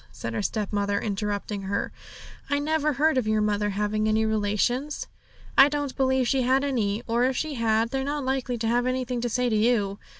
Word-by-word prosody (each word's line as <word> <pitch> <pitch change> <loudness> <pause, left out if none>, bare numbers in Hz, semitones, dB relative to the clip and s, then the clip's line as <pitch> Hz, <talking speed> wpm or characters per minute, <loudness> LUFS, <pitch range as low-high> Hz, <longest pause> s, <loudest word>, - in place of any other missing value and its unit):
said 115 - -6
her - - -1
stepmother, 205 -1 -1
interrupting 205 0 -3
her. 195 +1 -2 0.6
'I 285 - +2
never 305 +1 0
heard 300 0 +2
of 230 - -3
your 215 0 +2
mother 210 0 +1
having 210 +1 -1
any 220 +1 +2
relations; 220 +7 0 0.5
I 275 +1 +8
don't 290 -2 -3
believe 260 -2 +2
she 270 0 +2
had 260 +2 +2
any, 230 -6 -1
or 235 +1 +1
if 260 0 0
she 310 -1 -2
had, 230 -2 +1
they're 270 0 -1
not 285 0 -2
likely 260 -2 -1
to 225 0 -2
have 245 +2 +1
anything 255 -1 -1
to 240 - -1
say 250 +2 0
to 225 - +1
you. 210 -3 +1
235 Hz, 200 wpm, -26 LUFS, 210-265 Hz, 0.6 s, I